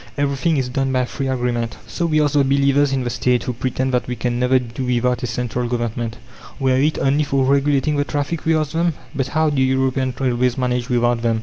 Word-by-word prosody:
Everything 145 Hz, +3 st, +1 dB
is 130 Hz, -2 st, 0 dB
done 135 Hz, +1 st, -1 dB
by 130 Hz, -1 st, +1 dB
free 135 Hz, +2 st, -4 dB
agreement. 120 Hz, -3 st, -1 dB
So 170 Hz, -, -2 dB
we 155 Hz, -1 st, +2 dB
ask 145 Hz, -1 st, 0 dB
the 145 Hz, -1 st, +4 dB
believers 140 Hz, +1 st, +3 dB
in 135 Hz, -1 st, 0 dB
the 120 Hz, -, -2 dB
State, 125 Hz, +1 st, +1 dB
who 125 Hz, -, -3 dB
pretend 130 Hz, +2 st, -2 dB
that 125 Hz, -, 0 dB
"we 125 Hz, -, -3 dB
can 120 Hz, +1 st, -2 dB
never 125 Hz, +1 st, +3 dB
do 125 Hz, 0 st, -4 dB
without 125 Hz, 0 st, 0 dB
a 125 Hz, -, -2 dB
central 120 Hz, +1 st, -2 dB
Government, 120 Hz, -1 st, -3 dB, 0.4 s
were 130 Hz, -1 st, +2 dB
it 155 Hz, +2 st, +1 dB
only 140 Hz, +2 st, +2 dB
for 135 Hz, -2 st, +1 dB
regulating 140 Hz, +2 st, +2 dB
the 145 Hz, -, +2 dB
traffic," 145 Hz, +3 st, -3 dB
we 160 Hz, 0 st, +2 dB
ask 155 Hz, -2 st, -1 dB
them: 170 Hz, 0 st, +1 dB, 0.2 s
"But 135 Hz, -2 st, -1 dB
how 155 Hz, +3 st, +1 dB
do 140 Hz, -2 st, +1 dB
European 130 Hz, -1 st, +1 dB
railways 125 Hz, -1 st, +1 dB
manage 125 Hz, -1 st, -1 dB
without 120 Hz, -1 st, +1 dB
them? 115 Hz, -1 st, +1 dB
130 Hz, 225 wpm, -20 LUFS, 125-140 Hz, 0.4 s, the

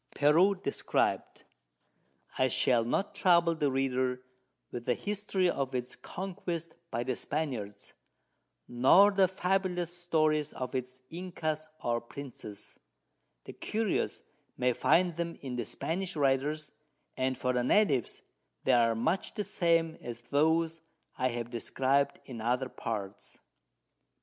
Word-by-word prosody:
Peru 165 Hz, +8 st, +5 dB
Described. 180 Hz, -7 st, -1 dB, 0.9 s
I 130 Hz, -, +3 dB
Shall 120 Hz, -1 st, +3 dB
not 155 Hz, -, -1 dB
trouble 170 Hz, -2 st, +4 dB
the 150 Hz, -3 st, +1 dB
Reader 130 Hz, -1 st, 0 dB, 0.5 s
with 120 Hz, -1 st, -6 dB
the 125 Hz, -, +2 dB
History 205 Hz, -2 st, -1 dB
of 135 Hz, -6 st, -1 dB
its 125 Hz, 0 st, -3 dB
Conquest 175 Hz, -3 st, -5 dB, 0.2 s
by 120 Hz, -4 st, -2 dB
the 130 Hz, 0 st, -1 dB
Spaniards, 120 Hz, -11 st, -4 dB, 0.7 s
nor 135 Hz, +12 st, +6 dB
the 195 Hz, -1 st, +4 dB
fabulous 180 Hz, -2 st, -1 dB
Stories 155 Hz, -4 st, +1 dB
of 130 Hz, -1 st, -5 dB
its 130 Hz, 0 st, -4 dB
Incas 160 Hz, -3 st, -3 dB, 0.2 s
or 120 Hz, 0 st, 0 dB
Princes, 120 Hz, -5 st, -9 dB, 0.6 s
the -, -, -9 dB
Curious 220 Hz, -2 st, -1 dB, 0.3 s
may 125 Hz, 0 st, +2 dB
find 170 Hz, +5 st, +3 dB
them 170 Hz, -1 st, -2 dB
in 130 Hz, -3 st, -5 dB
the 120 Hz, -2 st, -2 dB
Spanish 180 Hz, -, -3 dB
Writers, 145 Hz, +2 st, +1 dB, 0.4 s
and 130 Hz, 0 st, 0 dB
for 125 Hz, 0 st, 0 dB
the 125 Hz, -1 st, +1 dB
Natives, 140 Hz, -, +2 dB, 0.4 s
they 130 Hz, -, +3 dB
are 115 Hz, -2 st, +4 dB
much 160 Hz, +12 st, -1 dB
the 210 Hz, -, -1 dB
same 165 Hz, -3 st, +1 dB
as 120 Hz, 0 st, -7 dB
those 160 Hz, +2 st, +2 dB, 0.3 s
I 130 Hz, -, +1 dB
have 120 Hz, -1 st, -4 dB
described 135 Hz, +4 st, +1 dB
in 120 Hz, -4 st, -7 dB
other 125 Hz, +3 st, 0 dB
Parts. 100 Hz, -5 st, -6 dB
140 Hz, 130 wpm, -31 LUFS, 125-170 Hz, 0.9 s, nor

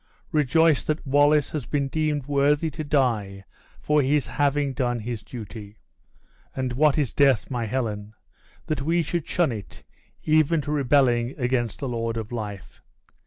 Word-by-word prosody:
Rejoice 155 Hz, +1 st, +3 dB
that 155 Hz, +1 st, -2 dB
Wallace 145 Hz, +2 st, +3 dB
has 145 Hz, -6 st, -4 dB
been 140 Hz, -2 st, 0 dB
deemed 150 Hz, -1 st, -1 dB
worthy 145 Hz, +2 st, +2 dB
to 155 Hz, -, -5 dB
die 115 Hz, -10 st, 0 dB, 0.4 s
for 150 Hz, 0 st, +2 dB
his 140 Hz, +1 st, +1 dB
having 145 Hz, -1 st, 0 dB
done 120 Hz, -1 st, -1 dB
his 115 Hz, 0 st, -5 dB
duty. 110 Hz, -3 st, -9 dB, 0.8 s
And 130 Hz, -2 st, -2 dB
what 150 Hz, +3 st, +3 dB
is 145 Hz, -5 st, 0 dB
death, 135 Hz, -4 st, +3 dB
my 120 Hz, -3 st, -2 dB
Helen, 110 Hz, -3 st, -3 dB, 0.5 s
that 155 Hz, -2 st, -2 dB
we 165 Hz, +4 st, +1 dB
should 165 Hz, 0 st, -3 dB
shun 175 Hz, -6 st, +1 dB
it, 105 Hz, -4 st, -8 dB, 0.4 s
even 155 Hz, +1 st, +3 dB
to 145 Hz, -, -5 dB
rebelling 130 Hz, -4 st, +2 dB
against 120 Hz, -3 st, -1 dB
the 135 Hz, -, -2 dB
Lord 115 Hz, -1 st, -2 dB
of 110 Hz, 0 st, -5 dB
Life? 105 Hz, -5 st, -7 dB
135 Hz, 155 wpm, -24 LUFS, 120-150 Hz, 0.8 s, Rejoice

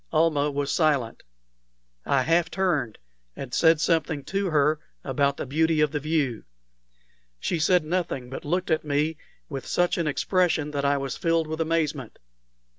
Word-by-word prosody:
Almah 155 Hz, -2 st, +2 dB
was 140 Hz, -1 st, -2 dB
silent. 145 Hz, -8 st, +1 dB, 0.9 s
I 135 Hz, -2 st, +3 dB
half 165 Hz, +3 st, +2 dB
turned, 160 Hz, -, -1 dB, 0.4 s
and 130 Hz, -2 st, -8 dB
said 160 Hz, -2 st, +4 dB
something 160 Hz, -3 st, 0 dB
to 195 Hz, +3 st, -2 dB
her 150 Hz, 0 st, +2 dB, 0.2 s
about 140 Hz, +1 st, 0 dB
the -, -, -4 dB
beauty 160 Hz, +3 st, +1 dB
of 150 Hz, -2 st, +3 dB
the 150 Hz, -, -2 dB
view. 145 Hz, -6 st, -1 dB, 1.0 s
She 170 Hz, -, -1 dB
said 175 Hz, 0 st, +3 dB
nothing, 160 Hz, -7 st, -2 dB
but -, -, -6 dB
looked 180 Hz, +4 st, -1 dB
at 160 Hz, -, +1 dB
me 150 Hz, +2 st, 0 dB, 0.3 s
with 135 Hz, -3 st, -6 dB
such 175 Hz, 0 st, +1 dB
an 165 Hz, -, 0 dB
expression 160 Hz, 0 st, +1 dB
that 140 Hz, -1 st, -2 dB
I 140 Hz, 0 st, +3 dB
was 135 Hz, -2 st, -4 dB
filled 165 Hz, -2 st, +1 dB
with 160 Hz, +1 st, -4 dB
amazement. 155 Hz, -6 st, -1 dB
155 Hz, 160 wpm, -25 LUFS, 140-165 Hz, 1.0 s, said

